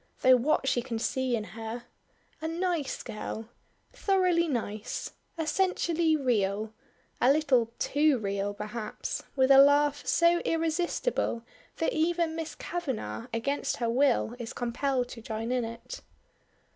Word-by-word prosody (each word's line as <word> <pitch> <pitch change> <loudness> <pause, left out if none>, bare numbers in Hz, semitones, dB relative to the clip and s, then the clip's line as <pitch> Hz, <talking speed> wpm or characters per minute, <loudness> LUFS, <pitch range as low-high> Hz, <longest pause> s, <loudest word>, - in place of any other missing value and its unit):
Though 255 0 +7
what 270 +2 +1
she 245 - +2
can 235 -2 -4
see 255 +2 0
in 220 - -2
her 225 +2 -7 0.6
A 320 - -2
nice 335 -4 -2
girl. 220 +1 -6 0.4
Thoroughly 365 -4 +2
nice 215 -6 -3 0.3
essentially 335 -1 +1
real 215 -5 0 0.5
a 255 - +6
little 265 -6 +3
too 295 -1 +3
real 200 -2 -2
perhaps," 215 +1 -4
with 260 0 +4
a 270 - +9
laugh 285 +1 +5
so 340 0 +4
irresistible 330 - -1 0.3
that 325 - 0
even 330 0 +1
Miss 325 -1 -5
Kavanagh 240 - -4
against 275 +5 -1
her 235 -1 0
will 255 -2 +2
is 235 0 -5
compelled 250 +1 -1
to 230 - -9
join 225 +1 -4
in 250 -1 +1
it. 230 - -7
260 Hz, 135 wpm, -29 LUFS, 230-320 Hz, 0.6 s, a